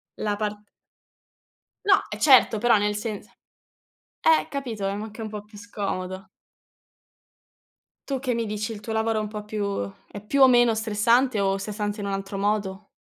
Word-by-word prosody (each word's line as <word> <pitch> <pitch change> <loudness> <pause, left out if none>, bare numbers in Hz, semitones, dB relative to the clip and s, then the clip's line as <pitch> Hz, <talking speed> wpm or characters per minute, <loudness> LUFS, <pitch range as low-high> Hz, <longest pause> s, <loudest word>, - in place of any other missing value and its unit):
la 210 -1 -1
part 210 0 -3 1.2
No, 390 -1 +5
eh 210 - -6
certo, 255 -5 +6
però 235 0 +4
nel 210 0 0
sens 210 -1 -4 1.0
eh, 320 -1 +4
capito, 240 -8 -4
ma 195 - +1
è - - -3
anche 215 +2 -7
un 215 - -4
po' 210 -1 -6
più 210 0 -15
scomodo. 195 -3 -5 1.8
Tu 270 -2 -1
che 255 -2 -1
mi 230 -1 -1
dici? 210 +2 -3
Il 210 - -6
tuo 220 +2 -7
lavoro 220 0 +1
è - - -1
un 210 - -3
po' 210 0 -6
più 210 -1 -3 0.5
è 205 - -7
più 280 +5 +1
o 265 - +10
meno 240 -2 +5
stressante, 225 +2 +2
o 195 0 +1
stressante 205 +1 -4
in 200 - -3
un 195 - -2
altro 195 0 -4
modo? 200 -1 -1
210 Hz, 180 wpm, -25 LUFS, 205-230 Hz, 1.8 s, o